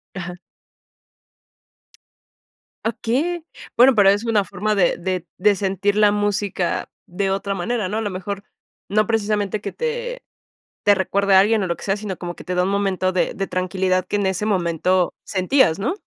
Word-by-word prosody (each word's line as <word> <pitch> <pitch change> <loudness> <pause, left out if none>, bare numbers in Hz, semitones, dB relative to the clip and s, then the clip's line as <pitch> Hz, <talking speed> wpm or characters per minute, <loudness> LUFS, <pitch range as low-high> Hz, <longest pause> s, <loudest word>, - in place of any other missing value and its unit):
Ajá. 175 -1 -5 2.5
Okey. 275 +10 -1 0.3
Bueno, 250 +1 +7
pero 200 -2 +6
es 205 +3 +2
una 220 -3 +2
forma 200 +3 -2
de 185 -4 +2
de 180 -1 -3
de 205 +2 +4
sentir 195 +1 0
la 210 -1 +5
música 205 -3 -1 0.2
de 190 +2 -1
otra 195 +1 -1
manera, 215 +2 -1
¿no? 215 - -2
A 225 - -1
lo 205 - -2
mejor, 195 +2 -5 0.5
no 215 +1 +2
precisamente 210 -2 0
que 200 - -4
te 485 +1 -3 0.6
te 205 - +6
recuerde 200 +1 +1
a 190 - +8
alguien 215 +1 +3
o - - 0
lo 170 -1 -2
que - - -11
sea, 195 0 0
sino 205 -3 -5
como 175 -1 -5
que - - -11
te 180 - -3
da 180 - +2
un 185 - 0
momento 195 -2 0
de 185 - 0
de 195 0 -2
tranquilidad 185 0 0
que 205 - -1
en 200 -1 0
ese 190 +3 -1
momento 180 -1 +1
sentías, 190 - +2
¿no? 240 - -1
200 Hz, 180 wpm, -21 LUFS, 185-215 Hz, 2.5 s, a